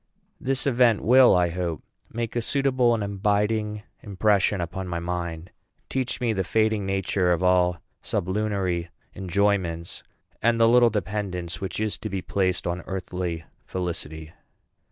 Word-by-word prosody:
This 135 +1 -1
event 120 -5 +3
will, 125 -1 +6
I 90 -1 +3
hope, 85 -3 -3 0.3
make 115 0 -4
a 120 - +1
suitable 130 -2 +2
and 110 - -2
abiding 105 +1 0 0.2
impression 100 0 +1
upon 90 +2 -4
my 85 -1 -3
mind, 85 -1 -4 0.4
teach 130 -2 -2
me 120 -3 +1
the 95 -2 0
fading 110 0 +1
nature 95 -1 +1
of 85 +1 +1
all 90 -1 +3 0.2
sublunary 95 -3 -1 0.3
enjoyments, 95 -3 -1 0.4
and 115 0 +2
the 115 - +6
little 120 0 +6
dependence 100 -4 -3
which 95 -1 -3
is 110 -1 -2
to 110 - -5
be 95 -2 -3
placed 95 -2 0
on 85 +1 -2
earthly 90 -3 -4 0.2
felicity. 80 -3 -5
95 Hz, 140 wpm, -25 LUFS, 90-110 Hz, 0.4 s, will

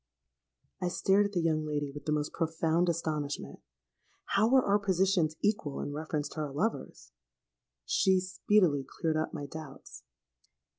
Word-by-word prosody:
'—I 180 - 0
stared 195 +3 +3
at - - -11
the 175 - +1
young 160 -2 +1
lady 145 -2 -2
with 145 +1 -9
the 150 - -1
most 150 -1 -1
profound 165 +1 +1
astonishment. 155 -3 -3 0.7
How 210 +3 +3
were 260 0 +5
our 200 +1 +3
positions 190 -4 +2
equal 205 -9 0
in 145 - -4
reference 150 -1 -3
to - - -8
our 150 -2 -3
lovers? 190 +12 -3 0.7
She 190 -1 +3
speedily 185 -5 +2
cleared 155 +4 -2
up 155 - -1
my 145 -3 -5
doubts. 145 -1 -10
160 Hz, 150 wpm, -30 LUFS, 150-190 Hz, 0.7 s, were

